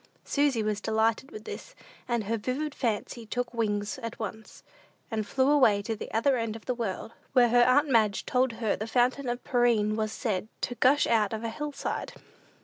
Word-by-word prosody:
Susy 280 Hz, -6 st, +1 dB
was 210 Hz, -1 st, -1 dB
delighted 220 Hz, +4 st, +1 dB
with 215 Hz, -, -9 dB
this, -, -, -8 dB, 0.3 s
and 235 Hz, -2 st, 0 dB
her 220 Hz, +3 st, -1 dB
vivid 260 Hz, +7 st, -2 dB
fancy 235 Hz, -1 st, -2 dB
took 245 Hz, +2 st, -3 dB
wings 210 Hz, 0 st, -1 dB
at 230 Hz, -2 st, -6 dB
once, 220 Hz, 0 st, -7 dB, 0.5 s
and 215 Hz, -2 st, -2 dB
flew 265 Hz, +4 st, +2 dB
away 255 Hz, -9 st, +5 dB
to 225 Hz, +1 st, -2 dB
the -, -, -8 dB
other 250 Hz, +4 st, +2 dB
end 230 Hz, -2 st, -2 dB
of 225 Hz, -, -10 dB
the 250 Hz, -, 0 dB
world, 225 Hz, -2 st, -4 dB, 0.2 s
where 245 Hz, -2 st, +5 dB
her 245 Hz, +1 st, +5 dB
aunt 285 Hz, +5 st, +4 dB
Madge 220 Hz, -6 st, +2 dB
told 255 Hz, -1 st, +1 dB
her 220 Hz, -2 st, 0 dB
the 215 Hz, -, -5 dB
fountain 250 Hz, +3 st, +1 dB
of 240 Hz, +1 st, -3 dB
Pirene 235 Hz, -4 st, +2 dB
was 215 Hz, -1 st, -1 dB
said 215 Hz, -4 st, -2 dB
to -, -, -1 dB
gush 265 Hz, +4 st, +4 dB
out 220 Hz, -2 st, +2 dB
of 220 Hz, +1 st, -4 dB
a 230 Hz, -, -1 dB
hill 295 Hz, +5 st, -4 dB
side. 280 Hz, -, -4 dB
230 Hz, 200 wpm, -28 LUFS, 215-255 Hz, 0.5 s, away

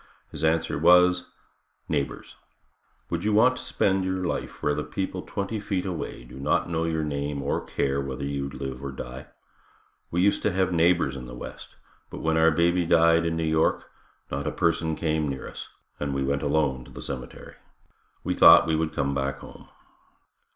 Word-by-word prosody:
His -, -, -7 dB
answer 80 Hz, 0 st, +1 dB
was. 90 Hz, +2 st, +5 dB, 0.6 s
"Neighbors. 70 Hz, -3 st, -3 dB, 0.8 s
Would 85 Hz, 0 st, -2 dB
you 105 Hz, 0 st, +1 dB
want 125 Hz, +5 st, +5 dB
to -, -, -7 dB
spend 95 Hz, -1 st, +1 dB
your 95 Hz, 0 st, -2 dB
life -, -, -4 dB
where 75 Hz, -, +2 dB
the 75 Hz, +1 st, -2 dB
people 95 Hz, -1 st, -4 dB
twenty 100 Hz, +3 st, -4 dB
feet 100 Hz, -2 st, -2 dB
away 90 Hz, -9 st, -5 dB
do -, -, -12 dB
not 80 Hz, +5 st, +1 dB
know 80 Hz, -1 st, -1 dB
your 80 Hz, -1 st, -1 dB
name 70 Hz, -1 st, -3 dB
or 70 Hz, -, -1 dB
care 70 Hz, 0 st, -1 dB
whether 70 Hz, 0 st, -5 dB
you 70 Hz, -1 st, -3 dB
live 65 Hz, -1 st, -6 dB
or 70 Hz, -, -4 dB
die? 65 Hz, -1 st, -8 dB, 0.8 s
We 85 Hz, -, 0 dB
used 100 Hz, +2 st, +3 dB
to 105 Hz, -, +1 dB
have 95 Hz, -1 st, 0 dB
neighbors 85 Hz, -4 st, +3 dB
in 65 Hz, -2 st, -7 dB
the -, -, -9 dB
west, -, -, -9 dB, 0.3 s
but -, -, -8 dB
when 80 Hz, 0 st, +1 dB
our 80 Hz, 0 st, +5 dB
baby 85 Hz, +2 st, +2 dB
died 85 Hz, 0 st, +4 dB
in 80 Hz, -, -1 dB
New 80 Hz, -, -1 dB
York, 80 Hz, 0 st, +1 dB, 0.4 s
not 70 Hz, +1 st, -3 dB
a -, -, 0 dB
person 80 Hz, -1 st, 0 dB
came 80 Hz, -2 st, 0 dB
near 65 Hz, -1 st, -4 dB
us, -, -, -8 dB, 0.3 s
and 70 Hz, -1 st, -2 dB
we 70 Hz, -, 0 dB
went 70 Hz, +1 st, 0 dB
alone 70 Hz, -3 st, 0 dB
to -, -, -15 dB
the -, -, -9 dB
cemetery. 65 Hz, -3 st, -7 dB, 0.7 s
We -, -, -1 dB
thought -, -, +8 dB
we 80 Hz, -, +1 dB
would 80 Hz, 0 st, -1 dB
come 70 Hz, -2 st, -1 dB
back 70 Hz, 0 st, -2 dB
home." -, -, -13 dB
80 Hz, 190 wpm, -26 LUFS, 70-90 Hz, 0.8 s, thought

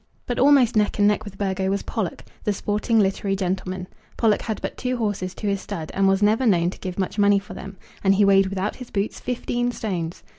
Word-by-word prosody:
But 245 Hz, -, -2 dB
almost 270 Hz, -4 st, +5 dB
neck 210 Hz, -1 st, +2 dB
and 205 Hz, -1 st, +4 dB
neck 210 Hz, +1 st, +1 dB
with 195 Hz, -2 st, -9 dB
Burgo 190 Hz, -1 st, -1 dB
was 200 Hz, +1 st, -1 dB
Pollock, 200 Hz, -7 st, -3 dB, 0.2 s
the 210 Hz, -, +1 dB
sporting 210 Hz, +3 st, 0 dB
literary 195 Hz, 0 st, +1 dB
gentleman. 185 Hz, -1 st, -3 dB, 0.3 s
Pollock 220 Hz, -3 st, +3 dB
had 220 Hz, -2 st, -3 dB
but -, -, -4 dB
two 255 Hz, 0 st, -2 dB
horses 205 Hz, -5 st, -2 dB
to -, -, -7 dB
his 200 Hz, -1 st, 0 dB
stud, 165 Hz, -7 st, -6 dB
and 195 Hz, 0 st, +2 dB
was 195 Hz, +1 st, +3 dB
never 220 Hz, +5 st, +3 dB
known 175 Hz, -4 st, +3 dB
to -, -, -12 dB
give 185 Hz, -2 st, -5 dB
much 195 Hz, +2 st, -2 dB
money 200 Hz, 0 st, +5 dB
for 195 Hz, -, -6 dB
them; 195 Hz, 0 st, -9 dB, 0.3 s
and 195 Hz, 0 st, +4 dB
he 205 Hz, +1 st, +4 dB
weighed 195 Hz, -1 st, +5 dB
without 195 Hz, +2 st, -3 dB
his 250 Hz, -2 st, -9 dB
boots, 200 Hz, +1 st, -2 dB
fifteen 245 Hz, 0 st, -2 dB
stones! 180 Hz, -8 st, -4 dB
200 Hz, 225 wpm, -23 LUFS, 190-215 Hz, 0.3 s, almost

